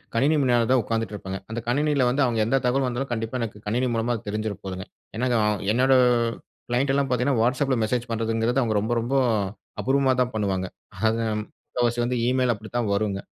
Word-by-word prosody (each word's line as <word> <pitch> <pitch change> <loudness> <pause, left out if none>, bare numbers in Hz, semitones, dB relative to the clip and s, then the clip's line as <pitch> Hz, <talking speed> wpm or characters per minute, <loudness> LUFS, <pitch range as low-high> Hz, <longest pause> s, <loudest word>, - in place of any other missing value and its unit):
கணினி 140 +7 +3
முன்னால 120 -3 +3
தான் 130 - +4
உட்காந்துட்டு 115 -1 -2
இருப்பேங்க. 95 -1 -5
அந்த 120 - -2
கணினியில 140 +1 +2
வந்து 140 +3 +2
அவங்க 120 -3 0
எந்த 135 +4 +2
தகவல் 130 +1 +2
வந்தாலும், 125 +1 -3
கண்டிப்பா 115 +2 -3
எனக்கு 105 -2 -4
கணினி 125 +4 +1
மூலமா 115 +2 0
அது 110 - -9
தெரிஞ்சிட 105 0 -2
போகுதுங்க. 95 -1 -5 0.3
ஏன்னா 125 +3 0 0.5
என்னோட 130 +2 +4 0.8
க்ளைண்ட்லாம் 135 +3 +1
பார்த்தீங்கன்னா, 125 0 +1
வாட்ஸ்அப்பில 130 +2 +1
மெசேஜ் 120 +2 -1
பண்ணுறதுங்கிறது 115 +3 0
அவங்க 110 -2 0
ரொம்ப, 110 +3 -1
ரொம்ப 120 +4 -3 0.7
அபூர்வமா 135 0 +2
தான் 125 -2 -1
பண்ணுவாங்க. 95 -3 -1 0.4
அது 115 +1 -1 0.2
முக்காவாசி 120 +2 -3
வந்து 125 +1 -1
ஈமெயில் 125 -1 +2
அப்டித்தான் 110 +1 -3
வரும்ங்க. 100 -1 0
120 Hz, 170 wpm, -24 LUFS, 110-130 Hz, 0.8 s, தான்